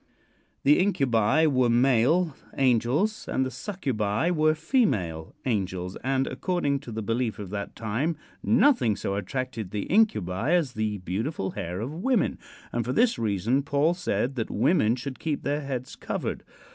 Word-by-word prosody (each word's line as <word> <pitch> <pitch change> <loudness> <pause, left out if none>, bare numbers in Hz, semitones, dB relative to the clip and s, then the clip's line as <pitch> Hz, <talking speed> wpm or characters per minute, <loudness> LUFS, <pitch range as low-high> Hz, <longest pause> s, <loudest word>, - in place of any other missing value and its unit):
The 145 +2 +5
Incubi 135 - +3
were 130 -5 +3
male 135 +7 +3 0.2
angels 135 - +1
and 130 - 0
the 130 - -4
Succubi 130 - -1
were 155 -2 +3
female 105 - 0
angels, 95 -6 -2
and 135 0 0
according 160 -7 -1
to 120 - -10
the 110 0 -4
belief 115 +1 -1
of 100 -3 -7
that 100 -1 -5
time 120 +9 -1 0.2
nothing 240 - +4
so 100 - -3
attracted 110 +1 -3
the 105 +1 -3
Incubi 135 - +2
as 155 -8 +1
the 110 -2 -1
beautiful 95 - -3
hair 90 +2 -4
of 125 +7 -4
women, 220 +6 0 0.3
and 120 - -1
for 125 +3 -2
this 235 - +3
reason 110 +4 +1
Paul 145 +4 +2
said 130 - -1
that 115 - -2
women 120 - +2
should 130 +1 -6
keep 155 -3 -2
their 145 +2 -1
heads 130 -3 -5
covered. - - -4
130 Hz, 155 wpm, -26 LUFS, 105-155 Hz, 0.3 s, The